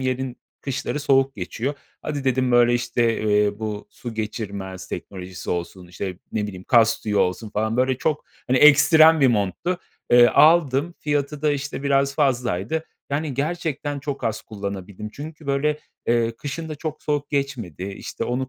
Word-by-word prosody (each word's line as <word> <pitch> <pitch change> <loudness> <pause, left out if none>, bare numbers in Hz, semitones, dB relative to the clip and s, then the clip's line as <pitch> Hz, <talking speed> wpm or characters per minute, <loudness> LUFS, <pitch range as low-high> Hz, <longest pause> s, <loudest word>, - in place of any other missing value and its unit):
yerin 130 -1 -2 0.2
kışları 140 +2 -3
soğuk 135 -1 +3
geçiyor. 120 +9 -3 0.3
Hadi 145 -2 -3
dedim, 130 -1 +1
böyle, 120 0 +5
işte, 120 -2 0
eee, 105 -1 +2
bu 105 -2 -4
su 120 -3 -8
geçirmez 100 -4 -5
teknolojisi 95 -1 -7
olsun, 90 +1 -4
işte, 90 +1 -6
ne 105 -1 -1
bileyim, 95 -2 -8
kaz 115 -1 +4
tüyü 105 -2 -2
olsun 100 +4 0
falan 110 +2 -1
böyle 130 0 +2
çok, 150 +1 -1 0.2
hani, 130 - +2
ekstrem 155 +2 +7
bir 135 - +6
monttu. 115 - 0 0.3
Eee, 120 0 +8
aldım, 155 +1 +4
fiyatı 145 0 -2
da, 150 - +3
işte, 140 -1 -4
biraz 140 0 +2
fazlaydı. 125 - 0 0.3
Yani 145 -1 -1
gerçekten 145 0 -2
çok 140 0 -5
az 110 -1 -1
kullanabildim 100 0 -6
çünkü, 155 +1 -9
böyle, 145 +2 +1 0.3
eee, 115 -1 +1
kışın 155 +5 -5
da 155 - -4
çok 155 +1 -6
soğuk 145 -1 -1
geçmedi. 130 - -3
İşte, 100 0 -5
onu 125 +1 -2
130 Hz, 160 wpm, -23 LUFS, 105-145 Hz, 0.3 s, Eee